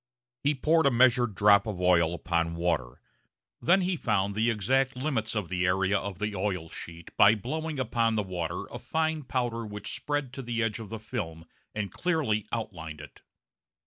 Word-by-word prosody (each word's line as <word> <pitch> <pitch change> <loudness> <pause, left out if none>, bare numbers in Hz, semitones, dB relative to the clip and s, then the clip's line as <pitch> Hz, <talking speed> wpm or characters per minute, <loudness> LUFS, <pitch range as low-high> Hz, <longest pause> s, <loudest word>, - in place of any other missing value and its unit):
He 145 +1 +2
poured 160 +3 +3
a - - +6
measured 120 -3 +4
drop 100 +1 +5
of 100 -4 -4
oil 85 -2 +3
upon 85 -1 -1
water. 85 -8 -1 0.6
Then 190 +4 +4
he 180 0 0
found 100 - 0
the 110 +3 +2
exact 130 +5 +1
limits 125 -5 -1
of 105 -5 -1
the 90 +1 -1
area 95 +2 +2
of 100 -2 -2
the 105 +1 -2
oil 95 -4 -2
sheet 85 +1 -9
by 105 +2 +7
blowing 155 +7 -4
upon 115 -2 +1
the 105 - +1
water 90 -4 -4
a - - -6
fine 160 -1 -1
powder 120 -3 -2
which 105 -2 -6
spread 135 0 -2
to 135 - -5
the 120 -2 -1
edge 110 0 -1
of 110 -3 -8
the 110 - -5
film 95 -8 -5 0.3
and 105 -2 -3
clearly 135 - 0
outlined 85 -9 -5
it. 75 - -12
110 Hz, 180 wpm, -28 LUFS, 90-130 Hz, 0.6 s, by